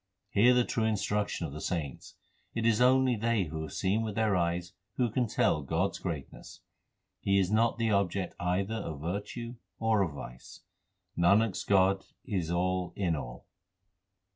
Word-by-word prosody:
Hear 120 +5 +5
the 125 - +4
true 115 -2 -1
instruction 105 -4 0
of 70 - -6
the 75 - -7
saints 75 -8 -4 0.4
It 115 -1 -1
is 115 0 +3
only 130 0 +5
they 115 -1 +1
who 80 -1 -5
have 80 - -6
seen 100 +4 +1
with 110 -2 -3
their 110 -3 +2
eyes 85 0 -1 0.2
who 120 -3 +1
can 125 +1 +1
tell 75 - +2
God 80 +7 0
s - - -8
greatness. 80 -7 -6 0.6
He 100 0 +2
is 95 0 +2
not 115 +2 +3
the 115 -1 +1
object 100 -2 0
either 95 +4 0
of 80 -10 -4
virtue 105 +8 -4 0.2
or 110 -2 +2
of 85 -6 0
vice. 65 -3 -10 0.5
Nanak 100 +6 +4
s - - -5
God 95 0 +3 0.2
is 95 -9 -2
all 90 +1 0
in 90 -5 0
all. - - -7
100 Hz, 170 wpm, -30 LUFS, 85-110 Hz, 0.6 s, Hear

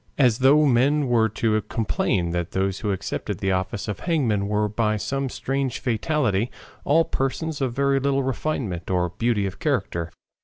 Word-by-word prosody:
As 125 -4 +4
though 145 +4 +5
men 140 +3 +3
were 115 -3 +3
to 110 0 0
complain 95 -6 -1
that 85 0 -3
those 95 0 0
who 105 - -1
accepted 95 - -3
the 95 - -1
office 95 +2 -2
of 105 - -4
hangman 120 - 0
were 105 0 +1
by 110 0 0
some 135 +5 -2
strange 135 0 -2
fatality 125 -4 0 0.3
all 160 +3 +3
persons 145 +3 -2
of 130 -3 0
very 140 +1 +2
little 140 0 +1
refinement 125 - -3
or 90 -1 +1
beauty 115 -4 +1
of 95 - -5
character. 85 0 -1
115 Hz, 165 wpm, -24 LUFS, 100-135 Hz, 0.3 s, though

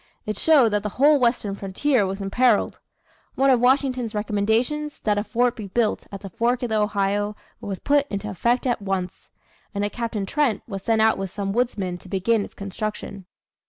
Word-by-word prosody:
It 215 - -2
showed 280 -2 +5
that 210 -1 0
the 210 - -3
whole 290 +2 +5
western 235 -5 +1
frontier 200 +4 0
was 195 +1 -4
imperilled. 225 +3 +2 0.6
One 270 0 +4
of 250 - +4
Washington's 255 -2 +1
recommendations, 225 +9 0
that 210 -1 +1
a - - -1
fort 240 +2 +1
be 215 -4 -7
built 215 +2 0
at 200 -1 -7
the 195 - -7
fork 240 +5 0
of 245 - -1
the 215 -1 +1
Ohio, 205 0 0 0.2
was 195 -2 -5
put 285 +4 +2
into 200 +1 -4
effect 235 +6 0
at 240 -4 0
once; 190 -2 -4 0.5
and 200 0 0
a 205 - -3
Captain 230 -4 -3
Trent 280 0 0
was 195 -4 -5
sent 220 +1 +2
out 220 -2 +3
with 195 -1 -3
some 195 +1 -3
woodsmen 200 -7 -1
to 185 - -15
begin 205 +3 +1
its - - -11
construction. 200 -1 -6
215 Hz, 195 wpm, -23 LUFS, 200-245 Hz, 0.6 s, showed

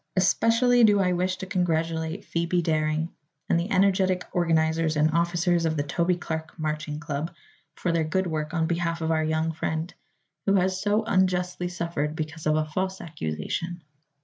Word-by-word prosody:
Especially 230 +6 +4
do 205 -2 +6
I 180 -2 +2
wish 185 +1 0
to 190 - -5
congratulate 165 -1 -1
Phoebe 170 +1 0
Daring 155 0 0 0.3
and 170 - +3
the 175 +4 -3
energetic 190 -2 +3
organizers 160 -2 +2
and 155 +1 +3
officers 170 +1 +1
of 160 -1 0
the 145 - +1
Toby 170 +5 +1
Clark 160 -2 -5
Marching 155 -1 -3
Club 150 +2 -3 0.4
for 180 - -1
their 165 -1 +2
good 190 +5 0
work 155 -2 -2
on 165 -2 +1
behalf 170 0 -1
of 160 0 0
our 160 -1 +2
young 160 +1 0
friend, 160 +1 -3 0.5
who 195 - +4
has 190 0 +1
so 210 +1 +2
unjustly 180 -4 +1
suffered 170 -4 -2
because 155 0 -4
of 155 - +3
a 155 0 +1
false 190 +5 -2
accusation. 165 - -4
170 Hz, 170 wpm, -26 LUFS, 160-185 Hz, 0.5 s, do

